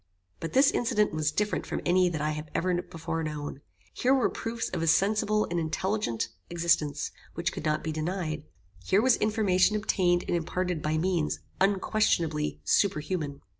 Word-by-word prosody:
But 165 Hz, -, -5 dB
this 270 Hz, +1 st, +6 dB
incident 210 Hz, -5 st, +1 dB
was 155 Hz, -1 st, 0 dB
different 210 Hz, +5 st, -1 dB
from -, -, -2 dB
any 180 Hz, +1 st, +4 dB
that 155 Hz, -4 st, -3 dB
I 155 Hz, +1 st, 0 dB
had 150 Hz, 0 st, -6 dB
ever 180 Hz, +1 st, +1 dB
before 165 Hz, -1 st, -4 dB
known. 150 Hz, -2 st, -5 dB, 0.3 s
Here 260 Hz, +2 st, +3 dB
were 260 Hz, -, +2 dB
proofs 230 Hz, 0 st, -3 dB
of 175 Hz, -, -3 dB
a 165 Hz, -, 0 dB
sensible 210 Hz, +5 st, +3 dB
and 175 Hz, -, 0 dB
intelligent 170 Hz, -, -1 dB, 0.2 s
existence, 160 Hz, -4 st, +1 dB, 0.2 s
which 170 Hz, +1 st, -1 dB
could -, -, -6 dB
not 155 Hz, 0 st, 0 dB
be 160 Hz, -, -2 dB
denied. 155 Hz, -1 st, -3 dB, 0.4 s
Here 190 Hz, -, +3 dB
was 255 Hz, -1 st, +5 dB
information 210 Hz, -2 st, +2 dB
obtained 180 Hz, -4 st, +2 dB
and -, -, +1 dB
imparted 180 Hz, 0 st, -2 dB
by 155 Hz, +1 st, 0 dB
means 170 Hz, -2 st, 0 dB, 0.2 s
unquestionably 185 Hz, -6 st, +1 dB
super 200 Hz, -6 st, +3 dB
human. 150 Hz, -3 st, -4 dB
175 Hz, 170 wpm, -28 LUFS, 155-200 Hz, 0.4 s, this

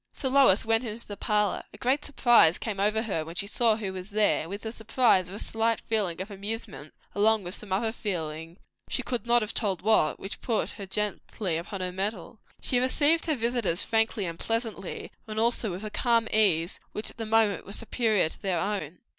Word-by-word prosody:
So 265 Hz, -, -2 dB
Lois 260 Hz, -7 st, +5 dB
went 225 Hz, +1 st, +2 dB
into 230 Hz, 0 st, -5 dB
the 205 Hz, -, -7 dB
parlour. 210 Hz, -1 st, 0 dB
A -, -, -13 dB
great 265 Hz, +4 st, +1 dB
surprise 240 Hz, -, +5 dB
came 210 Hz, -4 st, -4 dB
over 215 Hz, +2 st, +1 dB
her 195 Hz, -8 st, -2 dB
when 165 Hz, +2 st, -9 dB
she 200 Hz, -, -1 dB
saw 225 Hz, +2 st, +2 dB
who 205 Hz, -3 st, -4 dB
was 185 Hz, +1 st, -7 dB
there, 210 Hz, 0 st, +3 dB
and 160 Hz, -, -7 dB
with 200 Hz, +2 st, -6 dB
the 220 Hz, -, -4 dB
surprise 220 Hz, -5 st, +2 dB
a 195 Hz, -, -7 dB
slight 225 Hz, +1 st, 0 dB
feeling 205 Hz, -7 st, -1 dB
of 195 Hz, +3 st, -6 dB
amusement; 200 Hz, -6 st, -5 dB, 0.2 s
along 215 Hz, +1 st, +3 dB
with 175 Hz, +1 st, -6 dB
some 210 Hz, -2 st, -6 dB
other 220 Hz, +4 st, +1 dB
feeling, 165 Hz, -6 st, -5 dB, 0.3 s
she -, -, -1 dB
could 240 Hz, -3 st, -3 dB
not 240 Hz, -1 st, +4 dB
have 215 Hz, -, -4 dB
told 195 Hz, -6 st, 0 dB
what, 215 Hz, -7 st, +3 dB
which 195 Hz, -, -7 dB
put 230 Hz, -3 st, -1 dB
her 200 Hz, -, -8 dB
gently 205 Hz, -2 st, -1 dB
upon 180 Hz, +4 st, -5 dB
her 180 Hz, 0 st, -2 dB
mettle. 195 Hz, +2 st, -4 dB, 0.2 s
She 250 Hz, -, +1 dB
received 290 Hz, +6 st, +3 dB
her 310 Hz, -, +2 dB
visitors 235 Hz, -7 st, +1 dB
frankly 225 Hz, -2 st, +1 dB
and 165 Hz, -1 st, -5 dB
pleasantly, 225 Hz, -4 st, -3 dB, 0.2 s
and 215 Hz, 0 st, -3 dB
also 230 Hz, -1 st, +1 dB
with 185 Hz, +3 st, -6 dB
a 210 Hz, -, -5 dB
calm 230 Hz, -1 st, +2 dB
ease 180 Hz, -6 st, +3 dB
which 210 Hz, -, -3 dB
at -, -, -20 dB
the 225 Hz, -, -4 dB
moment 220 Hz, -2 st, +3 dB
was 200 Hz, -, -7 dB
superior 225 Hz, -5 st, +1 dB
to -, -, -12 dB
their 190 Hz, -3 st, 0 dB
own. 185 Hz, -4 st, -3 dB
210 Hz, 210 wpm, -27 LUFS, 190-225 Hz, 0.3 s, Lois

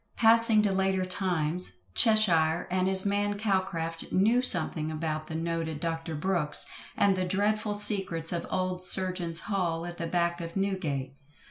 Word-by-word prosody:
Passing 225 Hz, -1 st, +5 dB
to 205 Hz, -, 0 dB
later 190 Hz, -1 st, -1 dB
times, 175 Hz, -, -1 dB
CHESHIRE 175 Hz, -, +3 dB
and 185 Hz, 0 st, 0 dB
his 190 Hz, 0 st, +6 dB
man 205 Hz, 0 st, -1 dB
Calcraft 185 Hz, -6 st, -3 dB
knew 220 Hz, +6 st, +2 dB
something 160 Hz, -8 st, +3 dB
about 155 Hz, 0 st, -4 dB
the 160 Hz, -, -7 dB
noted 165 Hz, -2 st, -4 dB
Dr. 165 Hz, 0 st, -4 dB
Brooks 160 Hz, -2 st, +1 dB, 0.3 s
and 200 Hz, -1 st, +2 dB
the 185 Hz, -, -2 dB
dreadful 205 Hz, +3 st, -1 dB
secrets 195 Hz, -6 st, -1 dB
of 170 Hz, -, -4 dB
old 185 Hz, -1 st, -3 dB
surgeon's 185 Hz, -3 st, -1 dB
hall 175 Hz, -5 st, -3 dB
at 175 Hz, 0 st, -9 dB
the 165 Hz, -, -3 dB
back 170 Hz, 0 st, -1 dB
of 165 Hz, 0 st, -8 dB
Newgate. 150 Hz, -9 st, -3 dB
180 Hz, 150 wpm, -27 LUFS, 165-195 Hz, 0.3 s, his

